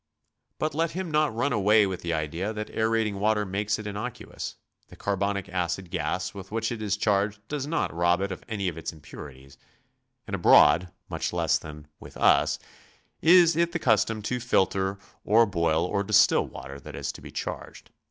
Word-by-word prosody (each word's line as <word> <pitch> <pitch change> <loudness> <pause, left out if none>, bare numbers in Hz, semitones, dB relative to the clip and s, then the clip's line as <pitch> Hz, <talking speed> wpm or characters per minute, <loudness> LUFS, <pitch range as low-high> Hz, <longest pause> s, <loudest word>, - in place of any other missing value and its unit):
But 155 - -1
let 165 +2 +1
him 180 -1 -4
not 150 -1 +2
run 140 +3 0
away 105 0 +4
with 95 -2 -4
the 85 - -3
idea 85 +6 -2
that 105 0 -5
aerating 110 -2 0
water 105 0 +2
makes 100 +2 -1
it 105 - -8
innocuous; 105 +4 -6 0.3
the - - -14
carbonic 100 -1 -2
acid 90 0 -3
gas 80 +5 -2
with 95 -1 -10
which 110 0 -1
k 120 - -4
is 100 -1 0
charged 105 0 +1
does 145 -2 -3
not 165 - -1
rob 85 +1 +2
it 100 0 -2
of 95 - -7
any 100 -4 -2
of 85 -2 -3
its - - -4
impuri'lies, 70 -3 -12 0.7
and - - -3
abroad 85 +4 +5 0.2
much - - -3
less - - +1
than 75 -1 -10
with - - -12
us - - +4 0.6
is 170 -1 +6
it 170 +1 +1
the - - +1
cus 115 -9 +3
tom 110 -2 -5
to 125 +4 -2
filter 95 -4 +1 0.3
or 115 +3 +5
boil 85 -4 +1
'or 100 +2 -1
distill - - +4
water 70 +1 -9
that - - -10
is - - -3
to - - -13
be - - -10
charged. - - -7
100 Hz, 190 wpm, -26 LUFS, 90-115 Hz, 0.7 s, is